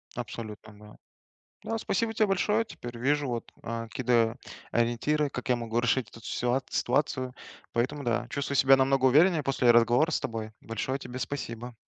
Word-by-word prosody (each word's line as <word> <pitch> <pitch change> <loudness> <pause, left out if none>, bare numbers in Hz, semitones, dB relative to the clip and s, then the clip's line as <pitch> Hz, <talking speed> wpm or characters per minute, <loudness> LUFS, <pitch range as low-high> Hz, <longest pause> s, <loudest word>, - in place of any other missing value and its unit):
Абсолютно, 110 -3 -7
да. 105 0 -14 0.7
Да, 225 - -1
спасибо 225 +1 -1
те 220 0 +3
большое, 210 +3 +1
теперь 120 - -9
вижу 145 +4 +1
вот, 120 -2 -4
э, 115 0 -4
какие-то 120 -2 +2 0.4
ориентиры, 120 +6 +1
как - - -6
я 125 - +3
могу 115 -1 -2
решить 120 -1 +1
эту 115 - -13
ситуа 125 +4 0
ситуацию, 130 -1 0 0.4
поэтому, 135 +5 -1
да, 120 -2 0
чувствую 140 0 -2
себя 135 +1 +7
намного 135 0 +2
увереннее 155 +5 +5
после 130 -3 +3
разговора 120 +7 +4
с - - +1
тобой. 110 -2 -4
Большое 130 +4 -3
тебе 125 -1 -7
спасибо. 125 -2 -5
125 Hz, 160 wpm, -28 LUFS, 115-145 Hz, 0.7 s, себя